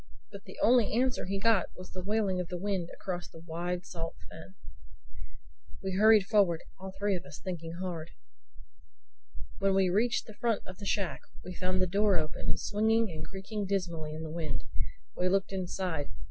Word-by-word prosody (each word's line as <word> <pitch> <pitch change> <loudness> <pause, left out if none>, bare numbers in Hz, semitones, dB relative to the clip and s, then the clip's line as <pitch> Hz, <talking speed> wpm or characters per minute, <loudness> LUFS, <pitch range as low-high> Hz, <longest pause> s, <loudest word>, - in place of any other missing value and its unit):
But - - -10
the - - -11
only 240 -4 +5
answer 255 -2 +2
he 195 +1 -1
got 215 -3 +4
was 185 - -10
the 185 - -5
wailing 200 -1 +1
of 180 - -2
the 180 - -4
wind 190 -2 -1
across 180 -2 -4
the - - -13
wide, 175 +2 -3
salt 165 -3 -5 0.2
fen. 95 0 -11 1.3
We 190 - -1
hurried 215 +1 +7
forward, 195 -5 +4 0.2
all 190 0 -6
three 200 -1 +2
of 175 - -4
us 145 +1 -10
thinking 170 -3 -4
hard. 170 -2 -4 1.5
When 195 -1 +3
we 190 -2 +4
reached 230 +5 +2
the 220 - -10
front 230 0 0
of 185 0 -9
the 200 - -5
shack 180 -11 0 0.2
we 180 - -6
found 185 +1 +1
the - - +4
door 200 +1 +3
open, 155 -1 -2
swinging 220 0 +2
and 155 -1 -5
creaking 195 +1 -4
dismally 170 -6 -1
in 160 - -5
the 160 - -5
wind. 165 -1 -2 0.5
We 180 +1 +2
looked 195 +1 +1
inside. 180 -5 -2
185 Hz, 180 wpm, -31 LUFS, 170-205 Hz, 1.5 s, hurried